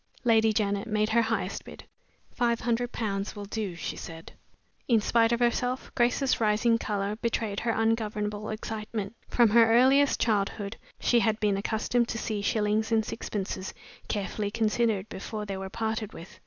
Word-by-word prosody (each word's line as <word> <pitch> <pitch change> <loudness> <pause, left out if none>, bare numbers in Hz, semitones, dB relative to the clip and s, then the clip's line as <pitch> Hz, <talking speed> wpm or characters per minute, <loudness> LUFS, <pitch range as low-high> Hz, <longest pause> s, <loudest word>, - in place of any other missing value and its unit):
Lady 225 -2 +4
Janet 205 0 0
made 215 0 +1
her 235 +1 +4
highest 225 0 -2
bid. - - -11 0.5
"Five 235 -2 0
hundred 240 +1 0
pounds 200 -3 -3
will 205 -1 -6
do," 200 -3 -4
she 165 - -4
said. 165 0 -9 0.6
In 230 -3 +4
spite 230 +2 +3
of 235 - +1
herself, 245 +1 0
Grace's 245 +2 +2
rising 225 +2 +3
color 205 -1 -2
betrayed 225 -3 -1
her 235 - -2
ungovernable 215 -2 -1
excitement. 215 -1 -4
From 240 -2 +4
her 230 0 +6
earliest 265 +4 +5
childhood 205 -1 0 0.2
she 240 - +3
had 220 -2 +1
been 205 -2 +2
accustomed 225 +4 0
to 230 - -3
see 215 -3 -2
shillings 215 +1 +1
and 220 -1 +3
sixpences 195 -4 -4 0.3
carefully 205 0 -2
considered 220 -2 +1
before 210 +2 -6
they 200 -1 -4
were 190 0 -5
parted 220 0 -3
with. 170 - -11
220 Hz, 160 wpm, -28 LUFS, 205-230 Hz, 0.6 s, her